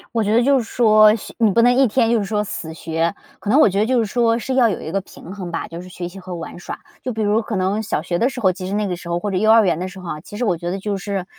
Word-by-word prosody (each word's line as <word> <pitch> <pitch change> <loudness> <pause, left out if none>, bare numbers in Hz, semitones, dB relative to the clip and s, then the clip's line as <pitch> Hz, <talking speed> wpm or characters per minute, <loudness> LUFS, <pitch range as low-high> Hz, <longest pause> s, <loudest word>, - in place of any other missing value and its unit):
我 225 - +2
觉 210 - 0
得 235 - +5
就 275 +2 +4
是 245 - 0
说 215 -2 +5
学 - - -10
你 220 -3 +4
不 230 - +3
能 245 +1 +5
一 265 0 +4
天 230 +1 +2
就 235 - +3
是 205 - -1
说 210 +1 -1
死 160 -5 -5
学， 165 +1 -2 0.3
可 205 - -5
能 265 +7 +5
我 - - +7
觉 195 -1 -1
得 - - +2
就 250 +1 +2
是 225 - +1
说 230 +1 +1
是 260 +3 -3
要 245 -3 +4
有 195 - -3
一 - - -6
个 195 +3 -1
平 185 -1 -12
衡 185 -4 -6
吧， - - -4
就 170 +1 -8
是 185 - -11
学 175 0 -6
习 185 +2 -10
和 185 0 -8
玩 165 0 -8
耍。 175 - -7 0.2
就 255 - -2
比 220 -2 -3
如 210 +2 +2
可 215 -2 -4
能 195 +4 0
小 215 - -2
学 175 - -2
的 240 +8 +2
时 265 - -7
候， 190 -5 +3
其 185 0 -7
实 185 - -5
那 210 0 0
个 180 - -2
时 170 0 -10
候， 170 0 0
或 205 - -3
者 195 - -3
幼 215 +4 +3
儿 225 -1 +6
园 175 - +1
的 185 +2 -4
时 190 +1 -11
候 180 -2 -8
啊， 150 - -6
其 205 - -10
实 245 - -1
我 185 -5 +1
觉 175 +1 -4
得 195 - -3
就 205 +1 -2
是 195 -1 -4
205 Hz, 380 characters per minute, -20 LUFS, 180-225 Hz, 0.3 s, 我